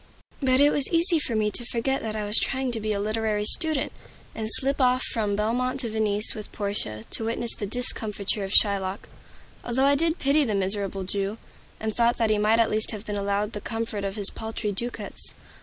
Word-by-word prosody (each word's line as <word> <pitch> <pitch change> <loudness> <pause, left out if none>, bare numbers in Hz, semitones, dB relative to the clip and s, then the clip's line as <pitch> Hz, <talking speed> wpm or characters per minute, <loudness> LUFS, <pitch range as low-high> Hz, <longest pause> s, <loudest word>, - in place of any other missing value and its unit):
But 260 -1 +2
it 290 +1 +5
was 280 -2 +2
easy 335 0 +4
for 240 -6 -3
me 210 -1 0
to 240 - +1
forget 250 +3 -2
that 220 -1 -4
I 210 -1 -3
was 210 +1 +5
trying 265 -1 -2
to 230 - -4
be 215 0 -3
a 205 - 0
literary 215 0 -1
student, 315 +3 +4 0.4
and 220 -1 -5
slip 275 +4 +8
off 255 0 +2
from 210 -4 -1
Belmont 250 +5 -1
to 235 - -3
Venice 215 -1 0
with 215 -2 -9
Portia 200 - -4
to - - -3
witness 230 +1 -1
the 205 - -6
discomfiture 210 -3 -2
of 195 - -5
Shylock; 200 -2 +1 0.6
although 255 +3 0
I 280 - +4
did 325 +3 0
pity 285 +2 +2
the 220 -6 -1
miserable 195 0 -1
Jew, 200 +3 -3 0.4
and 220 -1 -4
thought 235 -2 +1
he 210 - +1
might 215 +2 +3
at 230 - +2
least 215 +1 +1
have 215 -1 -5
been 210 - -4
allowed 200 +1 -2
the 205 - -6
comfort 225 -2 -4
of 195 0 -4
his 205 -2 +3
paltry 220 -1 -5
ducats. 240 +5 -6
220 Hz, 205 wpm, -25 LUFS, 205-250 Hz, 0.6 s, slip